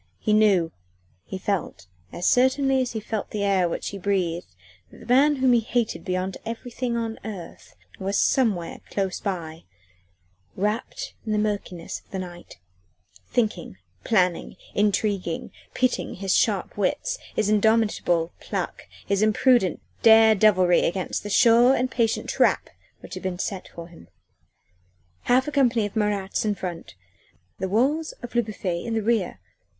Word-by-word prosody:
He 215 - 0
knew 200 -6 +4 0.5
he 190 - -6
felt 190 - -3 0.3
as 175 - -5
certainly 265 +1 +3
as 250 - -3
he 220 - -2
felt 215 -1 -4
the 210 -1 -3
air 190 -3 +2
which - - -3
he 200 - -7
breathed, 175 - -2 0.3
that - - -16
the - - -12
man 275 +5 +4
whom 260 -2 +3
he 240 - +5
hated 230 0 -2
beyond 185 0 -2
everything 235 +1 -4
on 225 -1 -3
earth 195 -6 -9 0.2
was 195 +1 -1
somewhere 210 -10 +1
close 195 -2 -2
by, 170 -6 -5 0.9
wrapped 220 - -3
in 215 - -2
the - - +1
murkiness 205 -5 -3
of - - -32
the 195 - -5
night 175 -2 -8 0.7
thinking, 230 -3 -1 0.3
planning, 180 -6 +1 0.2
intriguing, 200 -4 0 0.2
pitting 255 -1 0
his 195 0 0
sharp - - +1
wits, - - -1 0.2
his 215 - +1
indomitable 210 -6 +2
pluck, - - -5 0.2
his 200 0 0
impudent 215 -2 +3 0.2
dare 220 0 +7
devilry 185 -4 +4
against 185 +2 -1
the 205 - -7
sure 235 +4 +5
and 255 0 -1
patient 230 -2 0
trap - - +1 0.3
which - - -11
had - - -6
been 185 -2 -3
set 190 0 -4
for 170 0 -10
him. 170 - -16 1.2
Half 255 +2 +3
a - - -2
company 245 -6 +2
of 205 - -7
Marats 205 -3 0
in 210 -2 0
front 175 - -7 0.6
the 190 - -2
walls 280 +10 +1
of 240 - -7
Le 240 - +3
Bouffay 195 -6 -4
in 230 -1 -3
the 220 - 0
rear! 215 - 0
210 Hz, 155 wpm, -24 LUFS, 185-235 Hz, 1.2 s, dare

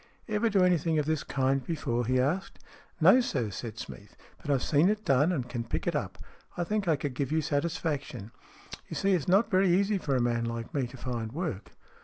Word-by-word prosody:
"Ever 215 +1 +1
do 195 -3 +3
anything 170 -3 +2
of 150 - +1
this 155 -1 0
kind 135 0 0
before?" 120 -8 -2
he 130 0 +2
asked. 155 +9 -1 0.2
" - - -31
No, 255 - +7
sir," 125 - -2
said 110 +2 -6
Smeath. 105 -2 -9
" - - -29
But 155 - -8
I've 135 -3 +2
seen 155 +5 +3
it 215 0 -1
done 140 +6 +3
and 130 -8 -2
can 120 -1 -4
pick 115 - -3
it - - 0
up. - - -3 0.4
I 175 - 0
think 210 +1 -1
I 160 - +4
could 140 -1 -4
give 135 +1 -2
you 160 0 +2
satis 155 +2 -1
faction. 140 -8 -4 0.6
You - - -5
see, 195 0 +2
it's 170 -6 0
not 200 +5 +3
very 190 0 +4
easy 200 +2 +2
for 140 -6 -1
a - - +2
man 120 -1 0
like 115 0 -5
me 135 -4 0
to 125 - -12
find 120 -4 -4
work." 125 - -4
145 Hz, 235 wpm, -29 LUFS, 125-180 Hz, 0.6 s, No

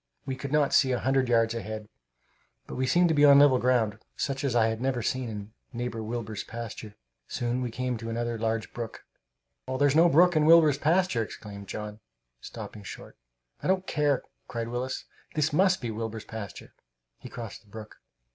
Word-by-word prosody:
We 135 -1 -3
could 135 +1 -6
not 150 -2 +2
see 130 -2 +5
a - - +1
hundred 135 -1 +1
yards 115 -1 +3
ahead, 110 -2 -5 0.8
but - - -9
we 130 0 -1
seemed 175 +5 +4
to - - +3
be 145 -1 +3
on 140 -1 +9
level 140 -3 +6
ground, 120 -4 +1 0.2
such 135 -1 -2
as 135 -4 0
I 115 -2 +5
had 110 +1 -1
never 130 -3 0
seen 130 +1 -1
in 105 0 -7 0.2
Neighbor 120 -1 -3
Wilbur's 110 -2 -4
pasture. 115 -2 -7 0.3
Soon 120 +1 -2
we 125 - -2
came 125 +1 -2
to 115 0 -6
another 120 0 -2
large 110 -1 -2
brook. 115 -2 -6 0.6
"There's 135 +2 +2
no 170 +2 +6
brook 175 +3 +5
in 155 0 +3
Wilbur's 160 -4 +6
pasture!" 165 -5 +2
exclaimed 100 -2 -8
John, 105 +1 -6 0.4
stopping 105 - -8
short. 100 - -10 0.5
"I - - -3
don't 190 0 +2
care!" 145 -5 +1 0.2
cried 115 -1 -4
Willis. 125 +2 -3 0.3
"This 155 0 +1
must 185 +3 +3
be 120 -3 -3
Wilbur's 110 0 -5
pasture!" 110 -4 -8 0.5
He 125 - -10
crossed 115 -5 -8
the 105 - -25
brook. 110 0 -10
120 Hz, 185 wpm, -28 LUFS, 110-140 Hz, 0.8 s, on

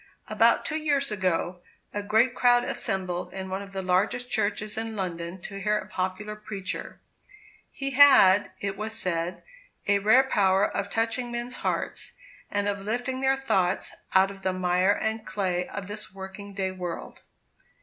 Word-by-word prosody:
About - - +3
two 310 - -1
years 285 -5 +1
ago, 185 -2 -1 0.3
a 205 - -2
great 220 +5 +3
crowd 245 -1 +4
assembled 185 -6 -2
in 190 0 -5
one 190 +1 -2
of 200 0 -10
the 190 -1 -4
largest 205 +7 0
churches 210 -1 0
in 225 0 -4
London 175 -2 -4
to 195 +2 -7
hear 210 +1 +2
a - - -5
popular 190 +3 -3
preacher. 205 -3 -5 0.7
He 275 0 -4
had, 255 -8 +7
it 195 -1 -3
was 220 +1 -4
said, 170 0 -2 0.4
a 200 0 +4
rare 220 +6 +6
power 195 -6 +3
of 200 0 -3
touching 230 +3 -1
men's 240 +1 -4
hearts, - - -3 0.4
and 205 0 0
of 200 -1 -1
lifting 245 +5 -2
their 270 0 +3
thoughts 190 -9 0 0.2
out 190 +1 +5
of 195 -1 -12
the 190 -1 0
mire 180 +1 +2
and 220 +1 -1
clay 185 -5 -1
of 200 - -6
this 210 0 -7
working 195 +1 -9
day 190 -1 -1
world. 180 -2 -6
200 Hz, 165 wpm, -27 LUFS, 190-225 Hz, 0.7 s, had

